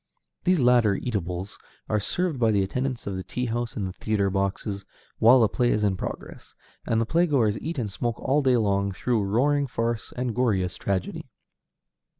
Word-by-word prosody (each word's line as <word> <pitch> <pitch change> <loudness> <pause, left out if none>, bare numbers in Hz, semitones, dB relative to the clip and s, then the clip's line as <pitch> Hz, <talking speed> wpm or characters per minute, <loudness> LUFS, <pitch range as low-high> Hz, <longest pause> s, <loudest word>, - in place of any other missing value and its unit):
These 180 -2 +3
latter 120 -5 +4
eatables 95 -4 -4 0.3
are 105 - +1
served 170 - -1
by 115 -2 +3
the 100 -3 +2
attendants 125 +5 -3
of 100 - -3
the - - -3
tea 125 +6 -3
house 120 0 -3
in 100 - -1
the 95 - -5
theatre 100 -1 0
boxes 100 +1 -2 0.4
while 120 +4 +7
the 110 - +5
play 120 +2 +1
is 105 - +1
in 100 -2 +2
progress, - - -7 0.3
and 115 - +2
the 115 - +1
playgoers 140 -8 +2
eat 160 +1 -4
and 110 -6 -2
smoke 120 +3 -3
all 140 +3 +1
day 130 -3 +3
long 100 -2 +1
through 115 +4 0
roaring 140 +8 +1
farce 115 -2 -2
or 125 - -1
goriest 110 -7 0
tragedy. 95 -2 -3
115 Hz, 180 wpm, -25 LUFS, 100-125 Hz, 0.4 s, while